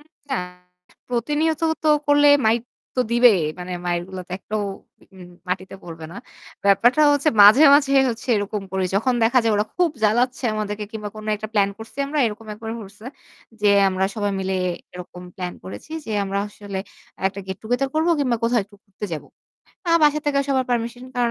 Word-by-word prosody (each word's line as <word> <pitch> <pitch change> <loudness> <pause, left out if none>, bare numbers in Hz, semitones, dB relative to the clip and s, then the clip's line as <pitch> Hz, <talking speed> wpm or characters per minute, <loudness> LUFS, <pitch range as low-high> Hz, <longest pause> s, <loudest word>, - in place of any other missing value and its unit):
উম 295 - -21 0.3
না - - +1 0.7
প্রতিনিয়ত 295 +6 0 0.2
তো 310 - +2 0.2
করলে 290 0 +5 0.2
মাইর 225 +2 +3 0.4
তো - - +3
দিবে। 240 0 +6 0.3
মানে 180 0 -6
মাইরগুলো 175 +2 -3
তো - - -8
একটাও 215 +2 -3 0.5
উম 180 -1 -12 0.2
মাটিতে 185 +1 -3
পড়বে 165 -2 -9
না। - - -10 0.5
ব্যাপারটা 240 +9 +4
হচ্ছে 285 +1 +2
মাঝে, 215 +8 +8
মাঝে 280 -1 +3 0.2
হচ্ছে 230 +2 -8
এরকম 205 0 -3
করি। 190 -1 0
যখন 245 +6 +2
দেখা 240 +3 +4
যায় 225 - +2
ওরা 210 - +1
খুব 350 -2 +2
জ্বালাচ্ছে 245 +5 +1
আমাদেরকে 210 0 -3
কিংবা 210 -2 -5
কোন 215 0 -9
একটা 215 +1 -7
প্ল্যান 200 -2 +2
করছি 225 +4 -12
আমরা 300 +2 -3
এরকম 220 +1 -6
একবার 220 +1 -7
করছে। 205 +2 -12 0.5
যে 210 - +3 0.2
আমরা 190 0 0
সবাই 205 -2 -1
মিলে 190 0 -1 0.4
এরকম 180 0 -9
প্লান 180 -1 -4
করেছি 190 - -9
যে 220 - -5
আমরা 195 0 -2
আসলে 205 -1 -7 0.5
একটা 200 +1 -3
গেট 190 0 -5
টুগেদার 245 +5 0
করব 315 +2 +1
কিংবা 255 -4 +1
কোথাও 235 +1 +2
একটু 205 +1 -21
ঘুরতে 200 0 -9
যাবো। 155 - -5 0.6
আমার 335 0 +4
বাসা 300 0 +4
থেকে 285 -1 +2
সবার 265 -2 +1
পারমিশন 240 +1 -2
কারণ 240 -1 +1
220 Hz, 180 wpm, -22 LUFS, 195-255 Hz, 0.7 s, মাঝে